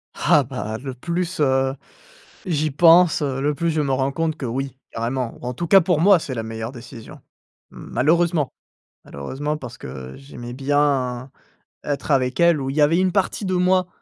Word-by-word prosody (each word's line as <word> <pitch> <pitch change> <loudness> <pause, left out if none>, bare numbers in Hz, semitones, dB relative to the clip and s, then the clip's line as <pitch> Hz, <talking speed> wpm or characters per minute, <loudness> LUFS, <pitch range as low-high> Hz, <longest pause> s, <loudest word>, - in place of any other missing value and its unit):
Ah 145 - +3
bah, 120 -4 -5
le 135 0 -6
plus, 170 +6 -3
heu 135 -1 +2 0.7
j'y 155 -4 0
pense, 165 +2 +5
le 140 +2 -1
plus 170 +1 -1
je 155 - 0
me 140 -2 -1
rends 130 +1 0
compte 160 +2 -2
que 135 - -5
oui, 135 +2 -3 0.2
carrément, 120 +1 -3
en 125 0 -3
tout 170 +7 -4
cas 195 +3 +7
pour 175 -2 +1
moi 195 -1 +6
c'est 140 - -6
la 115 - -3
meilleure 110 +1 -5
décision 120 -2 -11 0.5
malheureusement. 160 +3 0 0.5
Malheureusement 140 - -4
parce 125 -4 -9
que 65 0 -8
j'aimais 120 -3 -9
bien 135 -2 0 0.5
être 145 +1 -3
avec 130 0 +1
elle 170 -4 +4
où 135 - -3
il 135 - -5
y - - +3
avait 160 +4 +4
une 185 -1 +2
partie 195 +2 -1
de 185 - -1
moi 180 0 +2
140 Hz, 180 wpm, -22 LUFS, 125-165 Hz, 0.7 s, cas